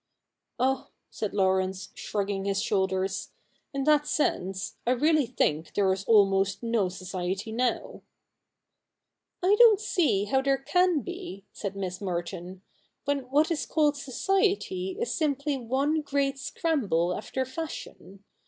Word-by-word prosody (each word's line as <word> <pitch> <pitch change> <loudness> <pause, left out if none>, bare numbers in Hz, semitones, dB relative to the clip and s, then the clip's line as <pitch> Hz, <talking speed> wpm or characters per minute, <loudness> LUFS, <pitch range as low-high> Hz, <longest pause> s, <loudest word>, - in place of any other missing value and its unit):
' - - -56
Oh,' 265 +1 +1 0.2
said 215 - -3
Laurence, 190 -1 +1
shrugging 200 -1 -3
his 200 0 0
shoulders, 190 -2 0 0.2
' - - -42
in 275 -1 -2
that 300 0 +3
sense, 190 -11 -1
I 250 - +5
really 300 +1 +3
think 160 -9 -1
there 195 -2 +3
is 195 +1 -5
almost 195 -2 +3
no 230 -5 +1
society 185 +3 -4
now.' 245 +2 -1 0.7
' - - -38
I 390 +3 +5
don't 450 -4 +8
see 315 - +1
how 265 +6 +2
there 275 0 +2
can 360 +3 +2
be,' 355 - -7
said 200 -2 -5
Miss 185 -1 -4
Merton, 180 0 -4 0.2
' - - -44
when 280 -3 -1
what 300 +5 +3
is 320 - -1
called 300 -2 +2
society 380 - 0
is 470 - -1
simply 290 -2 0
one 270 +5 0
great 275 -1 -1
scramble 200 - 0
after 260 0 -3
fashion. 260 - -7
245 Hz, 145 wpm, -28 LUFS, 195-300 Hz, 0.7 s, don't